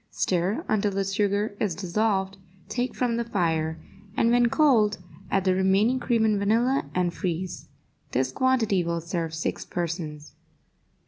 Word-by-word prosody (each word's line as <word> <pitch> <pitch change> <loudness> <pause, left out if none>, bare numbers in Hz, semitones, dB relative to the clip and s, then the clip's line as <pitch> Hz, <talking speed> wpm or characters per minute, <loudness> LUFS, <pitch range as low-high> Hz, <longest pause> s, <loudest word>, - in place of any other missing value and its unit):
Stir 190 - 0
until 210 -1 +1
the 195 0 0
sugar 205 +1 0
is 195 -6 0
dissolved, 195 +1 0 0.3
take 245 +5 -2
from 240 -2 0
the 235 - 0
fire, 165 -7 0 0.4
and, 230 - +3
when 240 0 +4
cold, 230 -8 +3 0.3
add 195 - +1
the 185 -1 +3
remaining 195 +7 +3
cream 230 -3 +1
and 215 -2 +2
vanilla, 235 +7 +1
and 180 -1 +1
freeze. 180 -1 -4 0.4
This 130 +1 0
quantity 225 - +2
will 170 0 -1
serve 165 -1 -3
six 160 - -3
persons. 160 -4 -5
195 Hz, 145 wpm, -26 LUFS, 175-225 Hz, 0.4 s, when